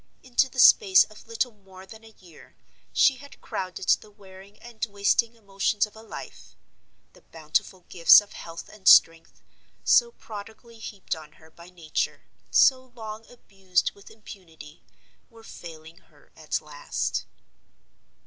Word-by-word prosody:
Into 260 +1 +1
the 260 - -15
space 380 - +7
of - - -16
little 440 - -2
more 190 -3 -16
than 220 +3 -14
a 220 -1 -17
year 175 -4 -18 0.4
she 265 -3 +3
had 285 +2 -15
crowded 185 -1 -6
the 215 - +2
wearing 200 0 -16
and 235 -2 -11
wasting 205 +3 +1
emotions 200 0 -1
of 210 - -19
a 220 - -13
life. 225 - -11 0.6
The - - -20
bountiful 160 +3 -3
gifts 170 -2 +7
of 205 -1 -11
health 165 0 -10
and 200 -3 -11
strength, 165 0 +5 0.4
so 475 -1 +4
prodigally 220 - -12
heaped 205 -5 -6
on 155 -1 -13
her 160 0 -20
by 170 +2 -15
Nature, 170 -4 -4 0.3
so 260 -1 +4
long 220 -1 -9
abused 195 -6 -2
with 200 - -17
impunity, 165 -8 -14 0.5
were 230 -2 -18
failing 165 -5 -12
her 190 - -25
at - - -3
last. - - -4
200 Hz, 145 wpm, -25 LUFS, 175-225 Hz, 0.6 s, space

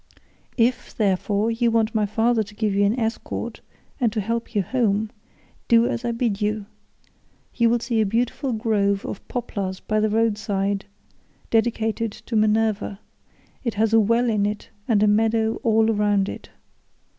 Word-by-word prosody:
"If, 240 +1 0
therefore, 205 +1 +1
you 235 +1 +1
want 225 -1 +1
my 215 -2 +1
father 225 +2 +2
to 210 0 -7
give 210 -2 0
you 200 +1 +3
an 220 +5 +1
escort 225 0 -3 0.4
and 240 -4 +2
to 220 - -2
help 230 +3 -3
you 205 - +2
home, 215 -2 0 0.6
do 230 0 +5
as 240 - -2
I 240 - 0
bid 230 -3 -1
you; 210 0 -1 0.9
you 235 -2 +3
will 240 - +3
see 235 -1 0
a - - +2
beautiful 245 +5 -1
grove 210 -3 0
of - - -7
poplars 200 -6 -4
by 215 0 -1
the 215 0 +2
road 220 -1 +1
side 200 -2 -1 0.7
dedicated 225 0 +1
to 230 - -7
Minerva; 215 -1 +1 0.6
it 235 -4 -2
has 220 +1 +1
a 225 - +7
well 230 +3 +2
in 210 -3 +2
it 210 0 -5 0.2
and 210 -3 +3
a - - +4
meadow 220 +1 +2
all 220 -1 +3
round 205 -2 +2
it. - - -8
220 Hz, 170 wpm, -23 LUFS, 210-230 Hz, 0.9 s, a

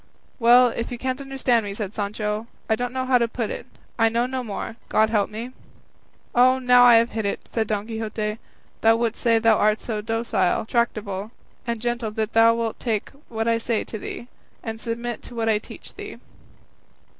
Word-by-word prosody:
"Well, 245 +1 +7
if 230 +1 -4
you 245 - -4
can't 260 +2 -3
understand 265 -4 +1
me," 200 -1 -5
said 210 -2 -4
Sancho, 210 +1 -3 0.2
"I 220 - +3
don't 245 +2 -3
know 260 0 -2
how 255 -1 +4
to 235 - +2
put 230 -1 -3
it; - - -6 0.3
I 225 0 +5
know 235 +2 +1
no 255 0 -3
more, 225 0 -5
God 220 0 +3
help 210 -3 +2
me." 225 +4 -6 0.8
"Oh, 255 +1 +5
now 250 -1 +6
I 240 -1 +8
have 230 +1 +4
hit 220 0 -2
it," 200 - -2
said 220 -2 -1
Don 210 -1 -1
Quixote; 220 -1 -3 0.4
"thou 225 0 +5
wouldst 230 0 -1
say 230 -2 +4
thou 225 -1 +4
art 215 +1 +3
so 215 -3 -3
docile, 220 -4 0
tractable, 215 -4 -1 0.4
and 235 -1 -1
gentle 240 -1 -2
that 215 +1 -3
thou 230 0 +6
wilt 230 -1 -3
take 220 -4 -2 0.2
what 225 0 -2
I 230 0 +2
say 230 -1 -1
to 220 - -7
thee, 235 - -7 0.4
and 225 -2 -5
submit 235 0 -4
to 245 - -11
what 225 -1 -1
I 215 -1 +3
teach - - -12
thee." - - -8
230 Hz, 200 wpm, -23 LUFS, 215-240 Hz, 0.8 s, I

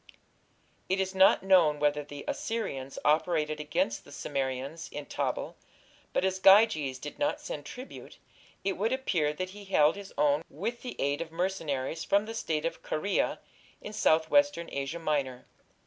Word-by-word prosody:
It 190 +1 +1
is 190 0 -1
not 190 0 +5
known 175 -6 +5
whether 150 0 +1
the 145 0 -9
Assyrians 140 -13 -3
operated 155 0 +2
against 130 -6 -1
the - - -16
Cimmerians 135 +3 -3
in 145 -1 -6
Tabal, - - -3 0.6
but, - - +1
as 190 0 0
Gyges 190 - +5
did 150 +3 -8
not 295 +1 0
send 150 - -6
tribute, 255 - -10 0.5
it 195 0 -1
would 215 +5 0
appear 175 - 0
that 185 +4 -5
he 205 +1 -11
held 155 -6 +4
his 200 -1 -9
own 145 0 +3
with 220 - -4
the 250 - -7
aid 140 +2 0
of 165 -1 -6
mercenaries 165 -4 -2
from 200 +1 +2
the 225 - -6
State 155 -8 -2
of 165 0 -3
Caria 195 +6 0 0.4
in 210 - -8
southwestern 170 - +3
Asia 140 +4 -3
Minor. 140 -6 -2
165 Hz, 160 wpm, -29 LUFS, 145-195 Hz, 0.6 s, not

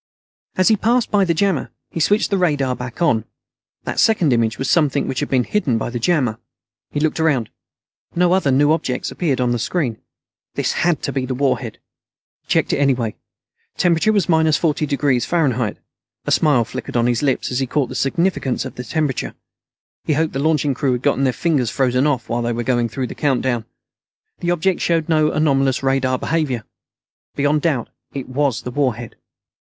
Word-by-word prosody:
As 185 +2 +3
he 220 - +5
passed 235 +3 +1
by 200 -2 +3
the 170 - +1
jammer, 190 -4 0 0.2
he - - -4
switched 205 +7 +2
the 200 - +2
radar 145 -7 +1
back 125 +6 -5
on. 115 -10 +2 0.6
That - - -3
second 180 - +3
image 115 -2 +1
was 135 - -3
something 150 -5 +2
which 130 - -2
had - - -2
been 130 -2 +2
hidden 140 - 0
by 115 - -3
the 120 - -3
jammer. 125 -6 +1 0.5
He 145 - -3
looked 155 +1 0
around. 140 -9 +1 0.6
No 175 +1 +3
other 185 -7 +2
new 145 +3 +4
objects 135 -6 -1
appeared 145 -8 -1
on 125 -1 +1
the 120 - 0
screen. 125 -4 -2 0.5
This - - 0
had 170 -3 0
to - - -1
be 130 -2 -2
the 130 - -2
warhead. 135 +1 -1 0.6
He - - -42
checked - - +1
it - - 0
anyway. 130 -6 +1 0.6
Temperature 175 +4 +3
was 200 -6 +1
minus 160 -2 +3
40° 145 -3 +1
F. 105 - -7 0.5
A - - -2
smile 145 -7 +3
flickered 120 - -5
on 120 - +2
his 120 -1 +1
lips 140 -2 0
as 125 - 0
he 135 - -1
caught 135 -1 0
the - - -6
significance 135 0 0
of - - -6
the 125 - -7
temperature. 150 -1 -2 0.7
He 155 - +1
hoped 155 +2 0
the 135 - -2
launching 150 -1 +1
crew 130 0 0
had 125 0 -3
gotten 140 -1 +2
their 130 - +3
fingers 130 0 0
frozen 130 +2 +1
off 130 -6 -1
while 120 +1 -1
they 120 0 -1
were 120 +1 -2
going 120 -1 +1
through 130 +3 -3
the - - -6
countdown. 130 -5 0 0.7
The 175 - -2
object 175 +1 +1
showed 165 -2 +1
no 155 -1 +3
anomalous 135 -4 +1
radar 135 -1 +1
behavior. 135 -7 -1 0.7
Beyond 145 +1 +1
doubt, 140 -8 0 0.3
it 135 - -4
was 130 -2 -1
the 125 - -5
warhead. 120 -4 -2
140 Hz, 190 wpm, -20 LUFS, 125-160 Hz, 0.7 s, he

